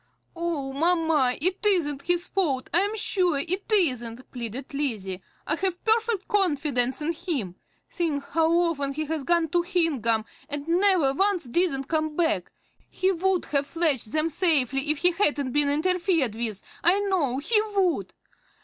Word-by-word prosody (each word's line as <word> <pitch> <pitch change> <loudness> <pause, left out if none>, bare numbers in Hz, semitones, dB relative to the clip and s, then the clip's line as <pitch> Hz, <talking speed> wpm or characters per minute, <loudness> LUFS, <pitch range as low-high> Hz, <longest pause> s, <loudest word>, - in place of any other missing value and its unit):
"Oh, 330 -6 -3
mamma, 320 -4 +2
it 370 +6 -1
isn't 325 -9 +2
his 350 +3 0
fault, 285 -10 -1
I 345 - +5
am 410 +3 -1
sure 365 -7 +2
it 370 +9 -3
isn't," 255 - 0
pleaded 250 +4 -6
Lizzie. 210 -10 -3 0.2
"I 305 - 0
have 370 -1 -3
perfect 445 -3 +1
confidence 290 -9 +1
in 330 +3 0
him. 305 - -3 0.3
Think 310 -5 -2
how 325 +1 +2
often 330 -5 +1
he 310 +2 -3
has 310 -1 -3
gone 340 +1 +1
to 350 +2 +2
Hingham, 290 - 0 0.2
and 290 +1 -4
never 350 -5 +3
once 390 +3 +1
didn't 270 +2 0
come 310 -1 -1
back! 330 -1 0 0.4
He 375 +1 +1
would 375 0 0
have 280 0 +1
fetched 300 -10 0
them 315 +1 +1
safely 285 -5 +1
if 305 - +1
he 355 +4 +3
hadn't 290 -8 0
been 290 +1 +3
interfered 330 - +1
with, 220 -3 -3 0.2
I 360 +4 +4
know 350 -11 0
he 425 +10 +2
would! 370 -4 +1
320 Hz, 160 wpm, -25 LUFS, 275-360 Hz, 0.4 s, I